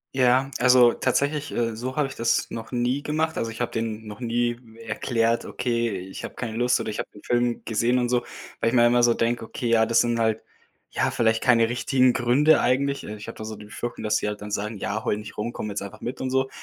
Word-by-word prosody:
Ja, 130 +1 +3
also 125 -1 +6
tatsächlich, 145 +3 0
äh, 115 -2 -1
so 125 +3 -5
habe 150 -2 +2
ich 135 - -9
das 115 0 +1
noch 115 -1 -7
nie 125 +3 0
gemacht. 160 +1 -1
Also 115 - -2
ich 115 - -10
habe 120 - -1
den 110 -1 -4
noch 105 +3 -9
nie 120 0 0 0.3
erklärt: 115 +1 0
„Okay, 115 -4 -1
ich 95 +1 -8
habe - - -6
keine 115 -3 -5
Lust 125 +1 +2
oder - - -3
ich 105 - -5
habe - - -4
den 105 - -15
Film 120 -1 0
gesehen“ 120 +3 +1
und 120 - +1
so, 125 0 +1 0.4
weil 115 - +2
ich 120 - -1
mir 120 -1 +6
immer 120 0 +3
so 120 -1 +5
denke: 115 0 0
„Okay, 120 - -4
ja, 115 -1 +4
das 115 0 +3
sind 120 -1 +2
halt, 110 -1 +1 0.5
ja, - - 0
vielleicht 110 -1 +1
keine 115 -3 +5
richtigen 125 +2 +2
Gründe 130 +7 +4
eigentlich.“ 140 +3 +1
Äh, 105 - -6
ich 105 - -10
habe - - -8
da - - -7
so 110 -1 -6
die 105 - -11
Befürchtung, 120 +3 -6
dass 105 0 +1
sie - - -2
halt 105 0 -6
dann 105 - -7
sagen: 105 +2 -3
„Ja, 105 +3 -3
heule 105 - 0
nicht 105 0 -9
rum, 110 +3 -2
komme 105 - -5
jetzt 100 0 -4
einfach 100 -1 -8
mit“ 125 - -5
und 130 - -2
so. 130 0 +1
120 Hz, 255 wpm, -25 LUFS, 110-125 Hz, 0.5 s, also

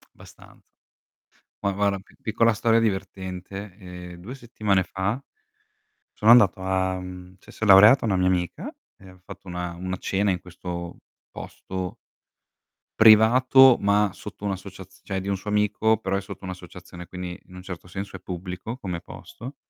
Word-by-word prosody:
Abbastanza - - -17 1.0
Ma 100 - +1
guarda, 100 0 0
pi 95 - -21
piccola 115 +1 +2
storia 115 +1 +2
divertente, 95 -1 -4
ehm, 90 -2 -10
2 110 +9 -8
settimane 105 -6 0
fa 95 +4 -2 1.0
sono 110 - +3
andato 105 -6 +6
a 95 0 0
mhmm, 90 0 -9
cioè - - -16
si - - -4
è - - 0
laureata 105 +6 +8
una 100 -3 +1
mia 90 0 +2
amica, 90 -2 -2 0.2
e 95 -1 -15
ha 95 - -18
fatto 95 - -12
una 90 -1 -5
una 90 +1 -5
cena 100 +1 0
in 90 -2 -1
questo 85 -1 -7 0.3
posto 95 -1 -7 1.0
privato, 120 +4 +7
ma 100 0 +2
sotto 105 0 -9
un'associazi 95 -1 -7
cioè 95 -1 -3
di 95 - -7
un 100 - 0
suo 95 +2 -7
amico, 105 +1 +2
però 100 -2 -2
è 100 - -1
sotto 100 - -10
un'associazione, 90 -1 -10
quindi 90 0 -7
in 90 - -15
un 90 - -10
certo 90 -1 -8
senso 95 +1 -7
è - - -7
pubblico 90 +6 -6
come 90 -7 -5
posto. 130 +5 -10
95 Hz, 160 wpm, -24 LUFS, 90-105 Hz, 1.0 s, laureata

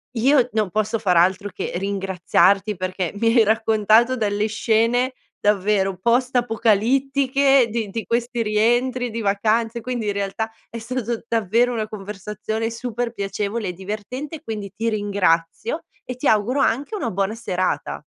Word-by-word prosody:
io 255 +1 +3
non 215 -3 +1
posso 215 +2 0
far 185 -5 +1
altro 190 +4 +3
che - - -4
ringraziarti 195 +1 +1
perché 185 -1 -3
mi 230 +3 0
hai 235 -2 +6
raccontato 220 +3 +3
delle 210 -1 0
scene 230 +4 +1 0.3
davvero 200 -2 +1
post 245 +6 +1
apocalittiche 260 +4 +3
di 220 -2 -2
di 225 +3 -4
questi 235 +1 -1
rientri 240 +4 +1
di 230 +1 -4
vacanze, 220 +3 +1
quindi 240 -2 -3
in 205 - 0
realtà 200 +2 -3 0.2
è 230 - -7
stato 235 0 -3
davvero 230 +2 +2
una 220 -2 -2
conversazione 210 +2 -4
super 235 0 -4
piacevole 200 0 -3
e - - -4
divertente, 215 - -6
quindi 210 -3 -5
ti 225 +3 -1
ringrazio 200 - 0 0.2
e 250 - -6
ti 265 - -1
auguro 220 +6 +2
anche 275 - 0
una 315 - -2
buona 195 +1 -1
serata. 185 -5 -2
220 Hz, 145 wpm, -22 LUFS, 200-240 Hz, 0.3 s, hai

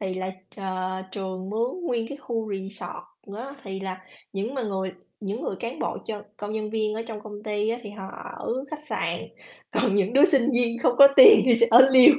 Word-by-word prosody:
thì 190 -2 -3
là, 185 0 -4 0.3
ờ, 185 -1 -4
trường 190 -1 -5
mướn 235 - -2
nguyên 230 -4 -2
cái 280 - -8
khu 225 -5 -4
resort 200 +1 -8
á. 265 +5 -7
Thì 190 -1 -6
là 185 -1 -6 0.3
những 205 +6 -4
mà 260 - -2
người 190 -3 -3 0.3
những 205 +3 -4
người 190 - -3
cán 235 +2 -5
bộ - - -3
cho 210 -2 -5
công 210 0 -6
nhân 215 -1 -4
viên 215 -1 -1
ở 225 - -4
trong 215 -2 -6
công 210 -1 -9
ty 210 0 -1
á, 235 - -3
thì 210 - -8
họ 195 -2 -9 0.3
ở - - -3 0.2
khách 300 0 -8
sạn, - - -2 0.5
còn 220 -2 +1
những 200 +2 +1
đứa 280 +5 +6
sinh 275 -7 +3
viên 240 -1 +2
không 245 - +4
có 280 - +11
tiền 435 -3 +10
thì 245 - +5
sẽ 235 0 +4
ở 255 +4 +9
lều. 260 +4 +9
215 Hz, 220 wpm, -25 LUFS, 195-240 Hz, 0.5 s, có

